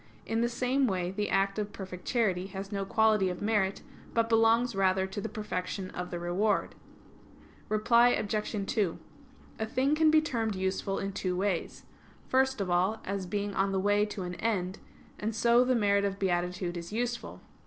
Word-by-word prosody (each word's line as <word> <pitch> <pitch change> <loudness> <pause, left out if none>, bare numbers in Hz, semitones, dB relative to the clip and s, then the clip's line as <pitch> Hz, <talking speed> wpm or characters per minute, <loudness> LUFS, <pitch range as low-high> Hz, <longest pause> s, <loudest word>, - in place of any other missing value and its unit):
In 225 +1 0
the 240 - +2
same 255 +3 +1
way 180 -3 -1
the 205 +2 -2
act 195 +1 +1
of 210 0 -3
perfect 185 -2 -8
charity 195 -6 +1
has 195 +1 -7
no 195 -1 -2
quality 215 -1 +3
of 180 -1 -4
merit, 205 -2 0 0.3
but 230 0 +2
belongs 225 +1 +4
rather 190 -1 +2
to 190 +2 -5
the - - -4
perfection 190 -2 -4
of 180 0 -5
the 175 - -4
reward. 175 +5 0 1.0
Reply 235 +3 +4
Obj. 210 -2 -1
2: 200 -6 0 0.6
A 220 - 0
thing 260 +5 +1
can 310 0 +4
be 310 0 +6
termed 230 -8 -1
useful 190 +1 -1
in 195 0 -3
two 185 -2 -2
ways. 190 -3 -2 0.4
First 265 -1 +2
of 190 -3 -1
all, 185 +5 +2
as 195 -1 -3
being 205 +2 -2
on 195 0 +1
the 190 - 0
way 205 +2 +3
to 205 -2 -5
an 180 0 -4
end; 190 -2 -2 0.4
and 215 +1 -2
so 235 +2 +5
the 255 0 +2
merit 200 -3 +3
of 200 -1 -1
beatitude 180 -1 -1
is 170 +1 -7
useful. 235 +1 -3
200 Hz, 185 wpm, -30 LUFS, 190-225 Hz, 1.0 s, be